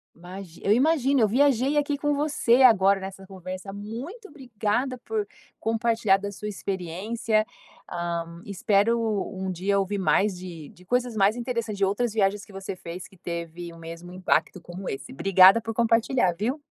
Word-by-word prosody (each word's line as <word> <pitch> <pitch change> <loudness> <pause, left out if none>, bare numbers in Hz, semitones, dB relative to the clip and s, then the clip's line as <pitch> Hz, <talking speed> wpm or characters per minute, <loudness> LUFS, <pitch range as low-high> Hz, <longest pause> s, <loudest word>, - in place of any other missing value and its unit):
Imagino. 180 0 -10
Eu 205 - +5
imagino, 275 0 +3
eu 215 - +5
viajei 275 +3 +2
aqui 290 0 +1
com 295 +1 0
você 280 -4 +3
agora 200 -5 +6
nessa 190 0 -8
conversa, 185 0 -7
muito 245 - -8
obrigada 250 -1 -2
por 430 -2 -2 0.3
compartilhar 225 -3 +2
da 200 +1 -5
sua 210 +2 -7
experiência. 205 +3 -2 0.5
Hã, 170 0 -4
espero 205 +4 +2 0.4
um 190 0 -3
dia 195 +3 0
ouvir 195 +1 -1
mais 195 +1 +2
de 170 -5 -9
de 180 +2 -19
coisas 245 +1 0
mais 205 +2 +3
interessantes, 235 -4 -3
de 195 - +3
outras 215 +3 -1
viagens 205 -1 +1
que 205 - -15
você 195 -1 -6
fez 175 +1 -8
que 190 - -21
teve 170 0 -6
o 165 - -13
mesmo 165 +2 -9
impacto 185 0 0
como 175 +3 -7
esse. 135 - -6
Obrigada 195 +7 +6
por 225 0 -5
compartilhar, 230 -2 +2
viu. 235 - -2
200 Hz, 165 wpm, -26 LUFS, 185-235 Hz, 0.5 s, agora